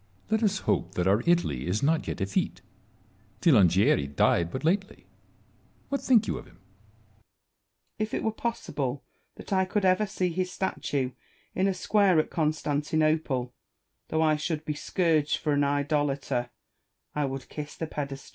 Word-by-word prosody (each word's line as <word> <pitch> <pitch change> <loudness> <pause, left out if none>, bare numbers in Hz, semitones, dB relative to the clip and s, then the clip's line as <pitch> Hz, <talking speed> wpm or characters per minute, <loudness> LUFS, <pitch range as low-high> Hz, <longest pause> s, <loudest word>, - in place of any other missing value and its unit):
Salomon. - - -35
Let 220 +1 +2
us 195 - -2
hope 90 - -1
that 90 - 0
our 100 +4 +4
Italy 120 - +1
is 100 +7 -1
not 160 +2 +2
yet - - -3
effete. 95 0 -1 0.8
Filangieri 100 - +4
died 85 +4 +2
but 130 - -5
lately: 195 +5 -1 0.8
what 280 - -1
think 230 -4 +4
you - - -2
of - - -13
him? 85 - -19
AJJieri. 105 +3 -33 0.6
If 215 0 -2
it - - -2
were 220 - +1
possible 145 - -3 0.3
that - - -6
I 190 0 +3
could 200 +1 0
ever 185 +3 +3
see 185 -2 -1
his 180 +1 -2
statue 140 -8 -2 0.4
in 190 +1 +1
a 195 - +1
square 195 -1 +3
at 155 - -1
Constantinople, 155 -3 0 0.5
though 160 0 +1
I 155 -1 +3
should 155 0 -3
be 150 - -1
scourged 155 -1 +1
for 150 - -1
an 145 0 +2
idolater, 140 -3 0 0.6
I 150 -1 0
would 135 -1 -5
kiss 150 -1 -7
the 160 - -3
pedestal. 140 -3 -6
150 Hz, 165 wpm, -27 LUFS, 125-180 Hz, 0.8 s, our